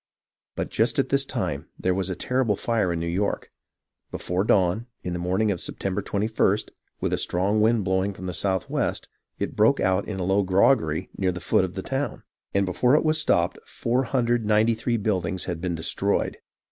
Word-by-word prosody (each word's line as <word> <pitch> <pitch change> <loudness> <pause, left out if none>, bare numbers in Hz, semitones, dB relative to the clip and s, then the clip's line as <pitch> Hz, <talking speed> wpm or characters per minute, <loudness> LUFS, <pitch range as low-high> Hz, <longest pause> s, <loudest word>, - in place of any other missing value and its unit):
But - - -3
just - - +1
at - - +1
this - - +2
time - - -3
there 90 - +1
was 95 0 -1
a 95 - -2
terrible 125 +1 0
fire 110 -4 0
in 85 - -1
New 85 - -2
York. 95 +4 -1 0.6
Before 90 +2 -1
dawn, 105 +3 +2 0.2
in 90 - -3
the 90 - -3
morning 95 +5 +1
of 90 - -3
September 95 -1 -3
21st, 105 0 0 0.3
with - - 0
a - - +1
strong 100 +4 +1
wind 110 0 +3
blowing 95 +1 0
from 95 - -8
the 90 - -3
southwest, 95 0 -1 0.3
it - - -3
broke - - +4
out 95 +1 +1
in 100 -3 -4
a - - -1
low 95 +3 +2
groggery 95 - +2
near 95 -2 +2
the 90 - -6
foot 90 - +2
of 95 -1 -4
the 95 - -4
town, 135 +2 -3 0.3
and 100 0 +2
before 125 +9 +3
it 155 - +2
was 155 0 +2
stopped - - +1
493 115 -2 +1
buildings 95 -4 -1
had 85 -3 -4
been 90 -2 -1
destroyed. 90 +5 -1
95 Hz, 185 wpm, -25 LUFS, 90-110 Hz, 0.6 s, broke